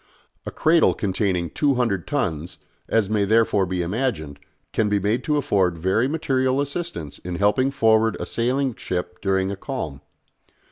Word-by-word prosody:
A - - -3
cradle 160 +1 +3
containing 95 -3 -1
200 125 - 0
tons, 90 - -2 0.3
as 115 -3 +2
may 105 0 +1
therefore 105 -2 +3
be 90 0 -1
imagined, 85 - -2 0.3
can 110 -2 +1
be 105 - +2
made 105 +5 0
to 150 -2 +1
afford 95 - +1
very 95 +9 +1
material 135 -3 0
assistance 140 - -4
in 90 0 -5
helping 105 +8 +2
forward 110 -4 +3
a - - -3
sailing 130 +2 0
ship 90 -3 -5
during 95 -1 +1
a - - -3
calm. 95 - -5
105 Hz, 150 wpm, -23 LUFS, 90-130 Hz, 0.3 s, cradle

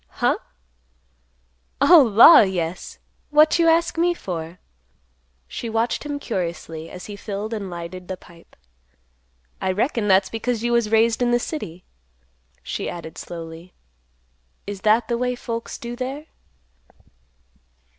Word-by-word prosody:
"Heh? - - +1 1.5
O 310 +4 +8
law! 235 +6 +8
yes. 180 -3 -1 0.3
What 305 +3 +4
you 335 - +4
ask 330 0 +2
me 345 +1 +2
for?" 170 - -6 0.9
She 230 - -6
watched 225 +2 -1
him 290 -1 -4
curiously, 170 - -5
as 180 - -9
he 205 - -8
filled 205 +2 -5
and 205 -3 -4
lighted 175 +1 -8
the 185 - -5
pipe. 170 -2 -19 1.1
"I 190 - 0
reckon 220 +2 -1
that's 190 0 +4
because 230 0 -2
you 240 - 0
was 235 -2 +2
raised 225 +2 +3
in 245 - +2
the 240 - +3
city," 185 - -6 0.8
he - - -4
added 170 -2 -8
slowly; 165 +1 -9 0.9
"is 200 -1 -6
that 220 +2 +3
the 235 -1 -1
way 250 0 0
folks 230 -1 -5
do 235 0 -7
there?" 265 +4 -5
220 Hz, 135 wpm, -22 LUFS, 180-245 Hz, 1.5 s, O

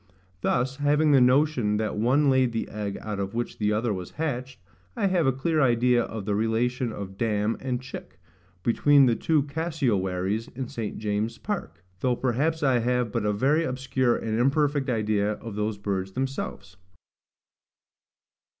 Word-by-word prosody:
Thus, 130 +2 0
having 150 +1 +3
the 135 -3 +6
notion 125 -4 +3
that 110 -1 -2
one 130 +7 +2
laid 130 -3 +3
the 115 - -2
egg 105 -2 -4
out 105 -2 -4
of 100 +2 -3
which 120 0 -3
the 105 -1 +1
other 110 +1 0
was 90 -2 -6
hatched, 130 -5 -3 0.4
I - - 0
have 180 -6 +2
a - - +5
clear 155 +4 0
idea 120 -1 +3
of 110 -4 -6
the 105 - 0
relation 115 +3 0
of 95 -2 -7
DAM 110 -1 +1
and 125 -2 -2
CHICK 130 0 -9 0.5
between 140 +4 +5
the 120 -2 +3
two 155 +1 +1
cassiowaries 115 - -1
in 130 0 -4
St. 110 -3 -5
James's 110 +2 -2
Park; 135 - -5 0.2
though 125 +3 +1
perhaps 145 +7 0
I 130 -3 +3
have 125 -1 0
but 110 -2 -1
a - - +2
very 135 +10 +2
obscure 130 -3 0
and 110 0 -2
imperfect 140 +1 +2
idea 105 -3 +1
of 110 +1 -8
those 105 0 -2
birds 95 -2 -3
themselves. 130 -7 -4
120 Hz, 165 wpm, -26 LUFS, 105-135 Hz, 0.5 s, the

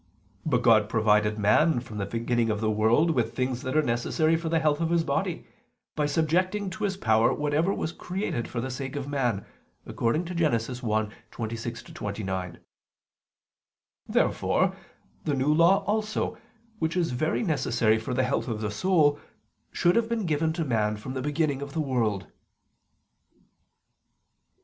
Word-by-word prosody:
But 125 -5 +1
God 110 -3 +5
provided 105 -1 +2
man 120 +8 +3
from 110 -3 -8
the 100 - -2
beginning 115 +1 0
of 105 -1 0
the 110 0 +1
world 115 +10 +3
with 115 -5 -1
things 125 -1 -1
that 135 +2 -2
are 155 - +4
necessary 155 +7 +1
for 165 0 -2
the 165 - +2
health 155 -1 +1
of 165 - +1
his 170 -1 +2
body, 140 -3 -2 0.5
by 150 -1 +1
subjecting 185 +6 0
to 210 +4 -3
his 195 -1 -2
power 110 - +3
whatever 150 +5 +1
was 160 - -2
created 180 - -3
for 120 - -4
the 130 +2 -3
sake 130 +2 -5
of 140 -1 -4
man 125 -8 -1 0.4
(Gen. - - -8
1:26 115 -6 -2
29). 95 -4 -4 1.5
Therefore - - +1 0.5
the 145 - 0
New 135 +3 +2
Law 170 +5 +4
also, 215 +1 -1 0.4
which 160 +3 -1
is 170 -5 +1
very 155 - 0
necessary 120 - +1
for 120 +3 -4
the 130 - +2
health 130 +2 -1
of 110 -3 -3
the 105 -1 -2
soul, 150 - +2 0.5
should 175 +1 +2
have 230 -1 +2
been 230 -3 -1
given 160 0 +1
to 165 -1 -2
man 105 -4 0
from 130 +5 -7
the 130 - -3
beginning 145 0 0
of 140 -1 -6
the 165 - -2
world. 120 -9 0
130 Hz, 155 wpm, -27 LUFS, 115-160 Hz, 1.5 s, God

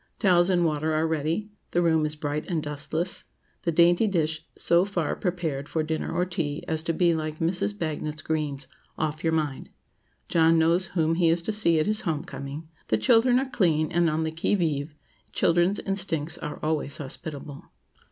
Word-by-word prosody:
Towels 180 -3 +4
and 175 -2 +3
water 155 0 0
are 155 +1 +2
ready; 160 +6 -1 0.2
the 175 - +1
room 160 -2 +3
is 150 - -4
bright 150 0 -3
and 165 -4 -1
dustless; 150 +4 -3 0.4
the 170 - 0
dainty 175 +6 +4
dish 160 -4 0
so 170 +1 +3
far 190 -6 -1
prepared 165 -7 -3
for 160 - 0
dinner 155 0 -2
or 180 - +1
tea 160 -4 -3
as 160 -1 0
to 165 - -1
be 170 +1 +3
like 155 -1 -3
Mrs. 165 - -1
Bagnet's 155 +1 -3
greens, 150 -3 -2 0.3
"off 155 0 -2
your 165 - +2
mind;" 150 -4 -2 0.6
John 165 0 +4
knows 170 +3 +3
whom 160 0 +3
he 165 0 +3
is 165 +1 +1
to 215 - -1
see 170 -7 +3
at 155 - +2
his 215 0 +1
home 155 -3 -2
coming; 140 +3 -7 0.2
the 110 - +2
children 230 - +4
are 265 0 -1
clean, 160 -10 +2
and 170 -1 +3
on 155 +1 0
the 160 - -2
qui 160 +5 0
vive—children's 165 +3 -1
instincts 175 -5 -1
are 150 - -5
always 155 -2 -1
hospitable. 145 0 -7
160 Hz, 180 wpm, -26 LUFS, 155-175 Hz, 0.6 s, Towels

